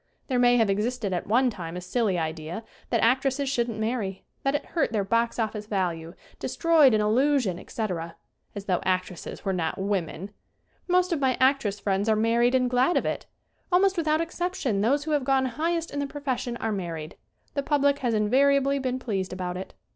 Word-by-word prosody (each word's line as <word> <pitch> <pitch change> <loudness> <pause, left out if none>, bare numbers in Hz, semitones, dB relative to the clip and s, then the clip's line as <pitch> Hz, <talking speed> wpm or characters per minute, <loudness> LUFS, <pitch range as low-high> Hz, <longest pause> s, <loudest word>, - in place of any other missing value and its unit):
There 255 -2 +1
may 245 0 +5
have 225 -2 +4
existed 210 +1 -1
at 175 - -3
one 245 +4 +3
time 175 -4 -6
a - - -3
silly 190 +1 0
idea 160 +4 -4 0.3
that - - +1
actresses 270 +3 +2
shouldn't 235 -4 -1
marry; 220 -4 -2 0.2
that 275 +1 +1
it 290 - -2
hurt 330 - 0
their 210 -3 0
box 230 +4 +1
office 215 -2 -2
value, 175 -5 -2 0.2
destroyed 315 -8 +4
an 215 - +2
illu 265 +7 +3
sion, 185 -8 -2
etc. 170 -7 -4 0.4
As 200 -1 -6
though 180 -3 0
actresses 185 +1 -3
were 195 - +1
not 165 -3 -2
women! 195 -1 -2 0.6
Most 360 0 +3
of 320 - -1
my 260 -2 +1
actress 260 -6 +2
friends 200 +1 0
are 220 - +4
mar 230 +2 +2
ried 245 +2 +4
and 255 -1 +3
glad 250 +7 +2
of - - 0
it. - - -3 0.4
Almost 380 +2 +4
without 315 -2 +1
exception 330 - -2
those 275 +7 +2
who 310 - -4
have 295 -3 +2
gone 265 0 +2
highest 330 +6 -1
in 285 - -3
the 285 - -1
profession 260 -4 -3
are 225 - -2
married. 170 -5 -5 0.4
The 280 - 0
public 285 0 +2
has 240 -3 0
invariably 275 +5 +3
been 255 -1 -1
pleased 195 -7 -3
about 180 -1 -4
it. 185 +1 -7
235 Hz, 195 wpm, -26 LUFS, 195-275 Hz, 0.6 s, may